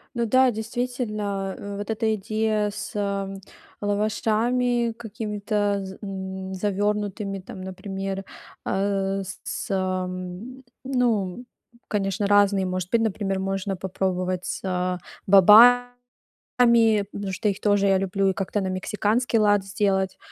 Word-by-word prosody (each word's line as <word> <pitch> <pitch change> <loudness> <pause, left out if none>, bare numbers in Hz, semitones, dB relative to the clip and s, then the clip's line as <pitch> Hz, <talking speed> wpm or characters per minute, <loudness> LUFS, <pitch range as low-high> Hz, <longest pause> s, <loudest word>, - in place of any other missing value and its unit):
Ну 235 -1 0
да, 255 +3 +4
действительно, 215 -4 -3
э, 200 0 -6
вот 205 +2 -6
эта 220 0 +1
идея 215 0 0
с - - -6 0.9
лавашами 230 +4 +1
какими-то 210 -2 -2
з 190 0 -9
м, 190 -1 -5
завернутыми, 205 0 -1
там, 185 +1 -10
например, 195 +1 -5 0.4
а, 195 0 0
с 200 +1 -6
ам, 185 +5 -3 0.2
ну, 245 -4 0 0.4
конечно, 200 -1 -1
разные, 200 -1 +4
может 185 -1 -3
быть. 235 - +3
Например, 200 -3 -1
можно 195 +1 -2
попробовать 185 -1 -2
с 180 -1 -2 0.3
бобами, 245 +5 +6 1.0
потому 200 -1 -4
что 210 +3 -1
их 195 - -2
тоже 205 -1 +3
я 195 -1 +4
люблю, 195 +1 0
и - - +1
как-то 200 +1 -2
на 190 - -2
мексиканский 210 +5 0
лад 205 -2 +3
сделать. 190 -1 0
200 Hz, 120 wpm, -24 LUFS, 190-220 Hz, 1.0 s, бобами